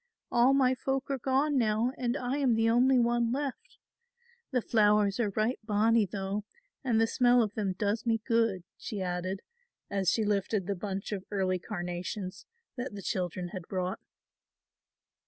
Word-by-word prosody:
All 245 +3 +5
my 260 -2 +4
folk 270 +2 -2
are 270 - -1
gone 270 +3 +2
now 225 +2 +2
and 245 +1 -1
I 255 +2 -2
am 260 -5 +3
the 225 0 +2
only 255 +3 +4
one 235 -1 +2
left. 285 - -4 0.7
The 250 -4 0
flowers 210 -2 +3
are 225 -3 +2
right 220 +4 +1
bonnie 215 0 +3
though 195 +2 -3 0.4
and 235 -4 +2
the 225 - +5
smell 245 +1 +4
of 210 -1 -3
them 200 -3 -1
does 205 +4 -1
me 225 -1 +3
good," 225 -6 +1 0.2
she 210 - -5
added, 180 +1 -3 0.5
as 195 -2 +1
she 220 - +1
lifted 205 -1 0
the 200 - -1
bunch 195 +1 -4
of 195 -3 -3
early 190 -2 0
carnations 185 0 -5 0.3
that 245 -4 -4
the 200 - -7
children 180 -1 -2
had 180 -3 -7
brought. 185 -1 -2
215 Hz, 165 wpm, -30 LUFS, 195-245 Hz, 0.7 s, All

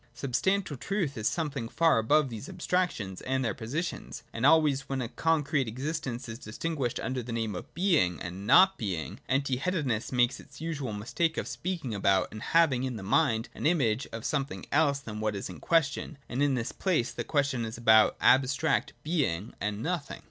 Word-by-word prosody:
Substantial 145 +6 0
truth 180 -2 -2
is 110 -3 -1
something 145 -8 -3
far 165 -4 +3
above 145 +6 +3
these 115 +3 -7
abstrac 180 0 0
tions 95 - -7
and 130 0 -1
their 115 - +1
oppositions. 130 - -4
— - - -36
And 115 +4 +2
always 150 -4 +3
when 135 -1 -1
a 125 - -2
con 160 +5 +1
crete 140 -2 0
existence 130 0 -4
is 115 +1 -7
disguised 135 +2 -3
under 125 +2 -2
the 120 0 -7
name 115 -2 -2
of 90 - -7
Being 165 - +2
and 95 +3 -6
not 190 - +6
Being, 90 - -3
empty 135 -1 +1
headedness 140 - -1
makes 125 0 +2
its 145 0 -14
usual 155 -6 -3
mis 105 +2 -7
take 165 -1 +1
of - - -2
speaking 170 -10 -4
about, 100 -2 +2
and 110 - -8
having 155 -6 +3
in 130 -2 -2
the 105 - -7
mind 110 +3 +2
an - - -1
image 135 -7 +1
of, 115 - -6
something 140 -2 -2
else 145 -2 +3
than 110 -6 -7
what 110 -1 -1
is 100 - -5
in 90 - -10
question: 160 -2 0
and 125 +3 -2
in 145 -2 +3
this 115 -2 -2
place 170 -11 0
the - - -4
question 140 -5 0
is 115 0 -5
about 110 -2 +5
abstract 135 +4 +3
Being 130 - -1
and 105 +1 -2
Nothing. 165 -4 -3
130 Hz, 200 wpm, -29 LUFS, 115-155 Hz, -, not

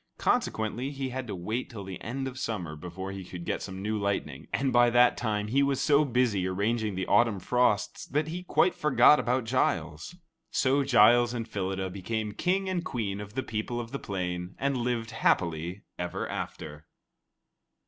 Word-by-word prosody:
Consequently, 110 +4 0
he 135 -2 -4
had 130 0 -5
to 105 - -4
wait 110 +8 -3
till 105 -5 -7
the 95 -1 -8
end 135 +4 -3
of 130 0 -7
summer 90 -11 -3
before 90 +5 -6
he 95 -1 -6
could 90 -1 -8
get - - -2
some 95 0 -6
new 105 +1 -1
lightning, 100 -9 -2
and 135 -1 0
by 120 0 +6
that 120 +1 +5
time, 105 -3 -1
he 135 +5 +3
was 140 -1 +1
so 145 0 +4
busy 120 -8 +1
arranging 105 +2 -1
the 95 0 -2
autumn 115 -2 +3
frosts 115 0 +1
that 150 +2 -1
he 175 +3 -4
quite 180 0 +2
forgot 150 0 +5
about 125 +1 +1
Giles. 85 - -1 0.3
So 140 +1 +2
Giles 120 -1 +5
and 115 -1 -3
Phyllida 95 -3 -3
became 105 +3 -3
King 190 - 0
and 185 -2 -1
Queen 105 -8 -3
of 105 +1 -10
the 130 - -1
people 115 +2 -3
of 115 -1 -6
the 140 - -4
plain 90 -2 -4
and 140 0 0
lived 120 -2 -1
happily 85 -2 0 0.2
ever 90 0 -3
after. 75 0 -6
110 Hz, 180 wpm, -28 LUFS, 95-130 Hz, 0.3 s, by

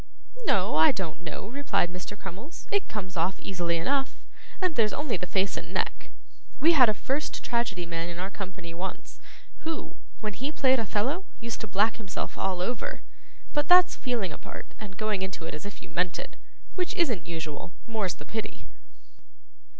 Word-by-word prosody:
'No, 190 -4 +4
I 160 - +8
don't 180 -3 -4
know,' 175 +3 -5
replied 215 -8 +1
Mr. 185 +3 -5
Crummles; 200 - -8
'it 405 -1 +2
comes 190 -3 -4
off 175 +3 +1
easily 175 -3 0
enough, 270 +11 +1 0.4
and 370 -3 +2
there's 225 -6 +3
only 295 -4 0
the 180 0 -3
face 190 +1 +2
and - - -5
neck. - - 0 0.5
We 320 +5 +7
had 260 -8 +8
a 215 - +2
first 275 +8 -1
tragedy 225 -7 0
man 170 0 -2
in 170 - -5
our 190 +2 -2
company 190 -4 -6
once, 185 +3 -5 0.4
who, 320 0 -4 0.2
when 215 -2 -2
he 270 +8 -2
played 265 -4 +4
Othello, 230 - 0
used 235 -1 -4
to 220 - -3
black 215 +3 +3
himself 200 -4 -4
all 185 -2 0
over. 250 - -2 0.5
But 295 -1 +2
that's 360 0 +8
feeling 235 - -1
a - - -8
part - - -8
and 200 -3 -8
going 215 -3 +1
into 190 -3 -3
it - - -4
as 150 +6 -5
if 205 - -9
you - - -11
meant 180 -1 +1
it; - - -6 0.4
it 360 - +1
isn't 250 - +2
usual; 160 -1 -4
more's 220 -5 0
the - - -10
pity. 220 -1 -4
205 Hz, 180 wpm, -29 LUFS, 180-255 Hz, 0.5 s, I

